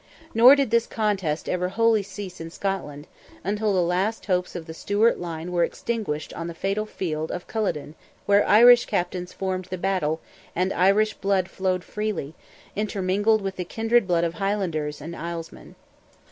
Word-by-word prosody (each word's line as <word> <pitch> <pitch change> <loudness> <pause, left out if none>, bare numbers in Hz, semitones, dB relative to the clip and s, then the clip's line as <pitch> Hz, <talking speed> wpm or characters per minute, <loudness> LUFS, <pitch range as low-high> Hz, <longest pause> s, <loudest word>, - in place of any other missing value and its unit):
Nor 245 +5 +8
did 275 -5 0
this 235 0 +3
contest 195 -8 -1
ever 180 0 -1
wholly 225 +1 +3
cease 195 -2 -8
in 165 - -6
Scotland, 165 -6 -4 0.4
until 210 +2 0
the 185 -2 +2
last 185 +4 -1
hopes 180 -2 -1
of 170 -2 -5
the 160 - -8
Stuart 205 +7 +1
line 170 0 -5
were 175 -1 +2
extinguished 185 -9 -3
on 165 - -5
the 170 - -6
fatal 195 +4 -2
field 160 -6 -3
of 180 - -5
Culloden, 195 -9 -2 0.3
where 200 0 +5
Irish 240 +3 +8
captains 180 0 -2
formed 185 -1 -3
the 185 - -5
battle, 175 -4 0 0.4
and 185 +2 0
Irish 205 +4 +3
blood 195 -2 0
flowed 185 -1 -1
freely, 210 -9 -4 0.4
intermingled 205 +1 +1
with 195 -1 -4
the 180 - -2
kindred 225 +3 +1
blood 170 -2 +2
of 170 -1 0
Highlanders 170 -8 -2
and 165 +4 -7
Islesmen. 170 -1 -7
190 Hz, 165 wpm, -24 LUFS, 170-210 Hz, 0.4 s, Nor